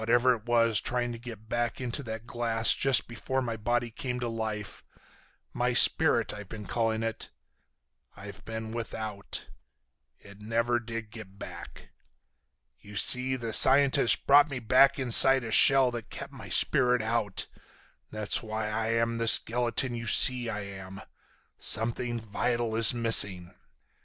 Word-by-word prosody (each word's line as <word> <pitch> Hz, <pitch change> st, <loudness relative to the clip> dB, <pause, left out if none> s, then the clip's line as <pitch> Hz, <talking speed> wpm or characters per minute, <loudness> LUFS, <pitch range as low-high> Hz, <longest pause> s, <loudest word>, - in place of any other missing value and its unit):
Whatever 120 Hz, +3 st, +1 dB
it 115 Hz, -1 st, -10 dB
was 115 Hz, -3 st, +1 dB
trying 120 Hz, -1 st, -3 dB
to 115 Hz, -, -9 dB
get 115 Hz, -3 st, -12 dB
back 120 Hz, 0 st, -4 dB
into 125 Hz, +2 st, -4 dB
that 110 Hz, -3 st, -8 dB
glass 115 Hz, -2 st, -1 dB
just 135 Hz, -2 st, +1 dB
before 120 Hz, +3 st, -5 dB
my 120 Hz, -3 st, -4 dB
body 120 Hz, +2 st, -3 dB
came 125 Hz, +2 st, -6 dB
to 120 Hz, -, -4 dB
life—my 110 Hz, -2 st, -8 dB
spirit, -, -, +2 dB
I've 105 Hz, -2 st, -11 dB
been 105 Hz, -2 st, -10 dB
calling 115 Hz, 0 st, -3 dB
it—I've 100 Hz, -2 st, -12 dB
been 110 Hz, 0 st, -8 dB
without. 110 Hz, -3 st, -7 dB, 0.7 s
It 100 Hz, +1 st, -18 dB
never 115 Hz, +2 st, -2 dB
did 115 Hz, -2 st, -9 dB
get 105 Hz, -4 st, -13 dB
back. -, -, -12 dB, 0.9 s
You 105 Hz, +1 st, -15 dB
see, 125 Hz, +5 st, -1 dB
the 115 Hz, -3 st, -6 dB
scientist 135 Hz, 0 st, +4 dB
brought 145 Hz, +2 st, +4 dB
me 135 Hz, -, -6 dB
back 130 Hz, +3 st, +2 dB
inside 135 Hz, 0 st, +7 dB
a 115 Hz, -, -7 dB
shell 135 Hz, +1 st, +4 dB
that 120 Hz, -2 st, -9 dB
kept -, -, -10 dB
my -, -, -12 dB
spirit 125 Hz, -2 st, +1 dB
out. 110 Hz, -3 st, -3 dB, 0.6 s
That's 110 Hz, -1 st, -2 dB
why 110 Hz, -1 st, -6 dB
I'm 115 Hz, +1 st, -2 dB
the 115 Hz, -, -3 dB
skeleton 120 Hz, +2 st, +3 dB
you 115 Hz, -1 st, -7 dB
see 125 Hz, +1 st, +5 dB
I 105 Hz, -2 st, -5 dB
am. 95 Hz, -1 st, -11 dB, 0.6 s
Something 120 Hz, +2 st, -2 dB
vital 115 Hz, +1 st, -4 dB
is 115 Hz, -1 st, +5 dB
missing." 100 Hz, -7 st, +3 dB
115 Hz, 140 wpm, -26 LUFS, 110-120 Hz, 0.9 s, inside